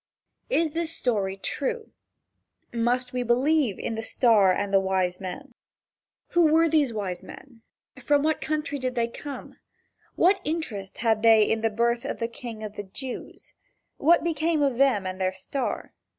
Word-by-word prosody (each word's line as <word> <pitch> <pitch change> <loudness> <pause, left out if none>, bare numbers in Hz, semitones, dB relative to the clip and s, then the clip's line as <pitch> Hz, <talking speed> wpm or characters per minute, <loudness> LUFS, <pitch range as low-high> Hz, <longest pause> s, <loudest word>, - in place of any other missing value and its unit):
Is 330 -9 +1
this 330 +1 -1
story 205 -10 0
true? 465 - -3 0.8
Must 245 +2 0
we 250 - -1
believe 250 0 +2
in - - -3
the 225 - -3
star 220 -4 +4
and 200 +2 -2
the 195 - +6
wise 190 -1 -1
men? 250 +9 -7 0.8
Who 340 -3 +4
were 325 +1 +5
these 300 -5 +2
wise 195 -5 -4
men? 245 -4 -13 0.4
From 290 -1 +2
what 315 0 0
country 300 -2 -2
did 255 0 -3
they 235 -1 +1
come? 280 +4 -9 0.6
What 380 +2 +3
interest 230 - -4
had 220 -2 +1
they 225 -1 +6
in 225 +1 0
the 225 - +2
birth 235 +2 0
of - - -4
the 230 - -2
King 230 -2 -8
of 210 -1 -7
the 205 - -4
Jews? 250 +6 -8 0.4
What 330 +3 +4
became 320 -1 +1
of 270 -4 +1
them 260 -8 +3
and 185 0 -4
their 185 0 +1
star? 255 +8 -4
240 Hz, 165 wpm, -26 LUFS, 210-300 Hz, 0.8 s, the